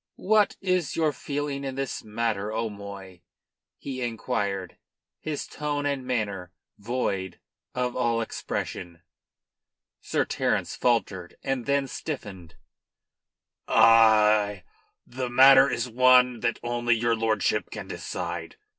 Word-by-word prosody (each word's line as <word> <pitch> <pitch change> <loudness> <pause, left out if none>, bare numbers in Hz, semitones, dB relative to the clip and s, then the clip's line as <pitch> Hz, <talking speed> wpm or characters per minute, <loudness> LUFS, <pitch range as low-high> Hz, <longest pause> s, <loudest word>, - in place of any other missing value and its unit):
"What 210 +1 +2
is 185 -5 0
your 155 -2 +1
feeling 145 0 -4
in 135 -1 -4
this 135 -1 -4
matter, 110 -1 -2
'O'Moy?" 100 -4 -6 0.6
he 130 -2 -6
inquired, 100 -6 -3 0.4
his 155 -2 -4
tone 145 -1 -3
and 140 -3 -2
manner 100 -8 -2 0.3
void 100 -5 -3 0.4
of 125 -1 -1
all 120 -2 +1
expression. 85 -5 -5 1.0
Sir - - -1
Terence - - -1
faltered; 100 -7 -1
then 135 +1 0
stiffened. 100 - -7 1.1
"I 105 -3 +5 0.4
The 125 0 -5
matter 135 +2 +7
is 120 -1 -2
one 125 0 +4
that 115 0 -1
only 120 0 +1
your 115 +1 +1
lordship 110 -2 0
can - - -7
decide. 85 -1 -5
120 Hz, 110 wpm, -26 LUFS, 105-135 Hz, 1.1 s, matter